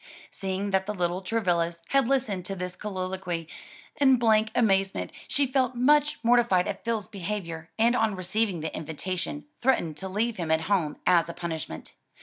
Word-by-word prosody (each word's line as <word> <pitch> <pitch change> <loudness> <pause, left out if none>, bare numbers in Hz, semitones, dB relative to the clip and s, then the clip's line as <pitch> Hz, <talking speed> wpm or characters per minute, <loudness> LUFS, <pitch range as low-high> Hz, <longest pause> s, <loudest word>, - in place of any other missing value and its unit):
Seeing 195 +1 -3
that 190 0 +1
the 210 - -2
little 180 0 -1
Travillas 175 -5 0
had 275 -3 +3
listened 245 -9 0
to 195 - -3
this 180 -1 -5
colloquy 185 -4 -4 0.5
in 270 -3 +6
blank 220 -2 +3
amazement, 195 -4 +2 0.2
she 280 - +2
felt 255 -1 +1
much 295 +4 +3
mortified 235 -6 +4
at 195 - -4
Phil's 225 -4 -1
behavior, 175 -5 -5
and 235 +2 +4
on 220 -4 +2
receiving 185 0 -1
the 160 - -4
invitation 180 - -4 0.2
threatened 175 - +1
to 190 +4 -5
leave 220 +4 -1
him 170 -3 -3
at 160 0 +3
home 165 -4 0
as 170 -2 +4
a 170 - -6
punishment. 160 - -5
195 Hz, 165 wpm, -27 LUFS, 175-230 Hz, 0.5 s, in